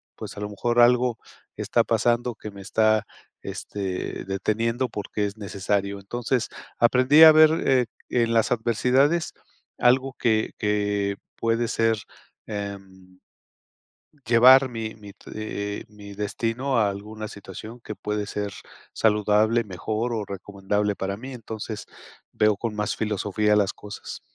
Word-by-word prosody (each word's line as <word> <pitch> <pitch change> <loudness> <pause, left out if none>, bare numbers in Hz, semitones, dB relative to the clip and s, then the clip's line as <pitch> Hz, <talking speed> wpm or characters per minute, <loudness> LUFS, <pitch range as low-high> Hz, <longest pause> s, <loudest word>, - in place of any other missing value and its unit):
pues, - - -8
a - - -5
lo 105 - -3
mejor 120 +4 0
algo 120 -1 +4 0.4
está - - +1
pasando, 120 0 +1
que 105 - -8
me 100 -1 -11
está, 110 +2 +2 0.4
este, 95 -3 -5
deteniendo 115 +6 -1
porque 105 -1 -3
es 100 0 -4
necesario". 100 -1 -2
Entonces 120 +4 -2 0.3
aprendí 130 +6 +6
a 160 - +11
ver, 155 0 +7 0.2
eh, 130 -2 +4 0.2
en 115 -1 +1
las 115 - +2
adversidades 125 +7 +2 0.5
algo 130 +2 +3
que 110 -2 +1
que 105 -1 0 0.2
puede 115 +1 0
ser, 115 -1 +1 0.5
em 95 -3 -7 1.1
llevar 130 +3 +7
mi 115 -2 -5
mi, 105 -2 -12
t - - -15
eh 105 -1 -4
eh, - - -12
mi 105 -1 -11
destino 115 +6 -2
a 105 -3 +3
alguna 105 +2 -6
situación 105 +4 -10
que 110 -2 -8
puede 105 0 -3
ser 100 -1 -4 0.4
saludable, 105 +2 +3
mejor 110 +4 -3
o 110 -3 -2
recomendable 100 +1 -2
para 100 +1 -3
mí. 130 +3 -8
Entonces 110 -2 -7 0.4
veo 105 -1 +3
con 110 0 -3
más 105 0 -1
filosofía 105 0 0
las 100 -2 +2
cosas. 105 0 -9
110 Hz, 140 wpm, -25 LUFS, 100-120 Hz, 1.1 s, a